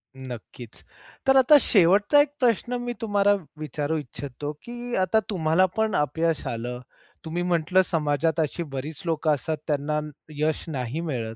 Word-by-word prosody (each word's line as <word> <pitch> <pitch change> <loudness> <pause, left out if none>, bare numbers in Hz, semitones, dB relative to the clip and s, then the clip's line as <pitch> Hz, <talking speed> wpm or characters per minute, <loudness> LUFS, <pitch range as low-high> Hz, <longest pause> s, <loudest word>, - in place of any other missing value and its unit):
नक्कीच. 125 -2 -10 0.4
तर 270 - +6
आता 270 +3 +7
शेवटचा 200 - +4
एक 290 - +1
प्रश्न 245 0 +1
मी 245 0 -3
तुम्हाला 205 -2 +3 0.3
विचारू 150 +1 -2
इच्छितो 145 0 -6
की 240 0 -7
अ, - - +2
आता 185 +4 +3
तुम्हाला 170 -2 +3
पण 220 -2 +1
अपयश 160 +3 0
आलं, 120 +1 -4 0.5
तुम्ही 170 +2 -2
म्हटलं 175 +1 +2
समाजात 155 0 0
अशी 160 +2 -1
बरीच 145 +2 -6
लोकं 160 -2 +1
असतात 155 +3 -2
त्यांना 150 0 0 0.4
यश 155 +1 0
नाही 135 +1 -3
मिळत. 120 -9 -4
160 Hz, 150 wpm, -25 LUFS, 145-195 Hz, 0.5 s, आता